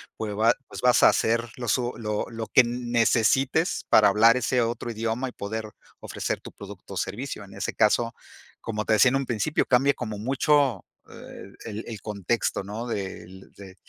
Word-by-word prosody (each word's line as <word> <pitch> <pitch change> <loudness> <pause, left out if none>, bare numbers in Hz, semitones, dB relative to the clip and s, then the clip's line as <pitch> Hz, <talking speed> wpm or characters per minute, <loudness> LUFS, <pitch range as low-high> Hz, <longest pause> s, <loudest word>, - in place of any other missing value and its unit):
pues 110 -2 -4
va 110 +2 +4 0.2
pues - - -8
vas 125 -1 +4
a - - +9
hacer 115 +1 0
lo 125 -1 -5
su 120 +2 0
lo 105 -2 -2
lo 115 -1 -6
que - - +6
n 120 0 -4
necesites 125 - +2
para 105 - +6
hablar 110 +4 +5
ese 125 +1 +1
otro 120 0 -2
idioma 115 +3 -2
y - - -14
poder 110 +2 -5 0.3
ofrecer - - -4
tu - - -11
producto 100 -1 -11
o - - -5
servicio. 105 +5 -4
En 100 - -14
ese 100 - -3
caso, 115 +2 +2 0.5
como 110 -1 -4
te - - +2
decía 120 +4 +6
en 135 - +1
un 135 - -2
principio, 120 +6 0
cambie 135 +3 +3
como 110 -2 -5
mucho, 135 0 +1 0.2
eh, 100 - -11
el 110 -1 -6
el 110 -4 -7
contexto, 105 +1 -2
¿no?, 105 +5 -6
del 95 -3 -7
de 95 -2 -12
115 Hz, 190 wpm, -25 LUFS, 105-125 Hz, 0.5 s, a